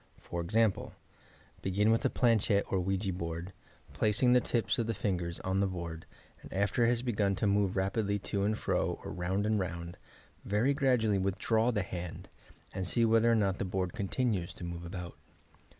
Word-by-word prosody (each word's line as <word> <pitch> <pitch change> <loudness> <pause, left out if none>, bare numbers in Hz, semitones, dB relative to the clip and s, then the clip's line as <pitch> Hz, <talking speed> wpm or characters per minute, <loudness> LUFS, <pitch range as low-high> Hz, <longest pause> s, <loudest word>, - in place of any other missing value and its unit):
For 85 - -5
example: 105 +4 +1 0.7
Begin 100 +3 +2
with 115 - +2
a - - +4
planchette 110 -4 +2
or 95 - +2
ouija 95 +1 -1
board, 85 +1 -5 0.4
placing 110 +4 +3
the 125 - +5
tips 115 -3 0
of 115 - 0
the 115 - -1
fingers 85 -4 -2
on 95 +1 0
the 100 - +2
board, 85 -3 -6 0.3
and - - -12
after 100 +5 +1
it - - +4
has 120 0 0
begun 105 -5 +1
to 105 - -1
move 100 -1 +2
rapidly 100 +2 0
to 100 0 -2
and 105 +1 +1
fro - - -1
or - - -6
round 95 +3 -1
and 110 -1 +2
round, 85 -2 -5 0.4
very 110 +7 +2
grad 130 -4 +2
ually 105 -3 +2
withdraw 110 +4 +1
the 105 -5 0
hand, 90 -2 -6 0.4
and 95 -1 -2
see 115 +5 +3
whether 115 +1 +4
or - - +4
not 100 -3 +1
the - - 0
board 95 -1 -2
continues 105 -3 -1
to - - -10
move 85 0 -5
about. 90 0 -7
100 Hz, 190 wpm, -31 LUFS, 90-110 Hz, 0.7 s, the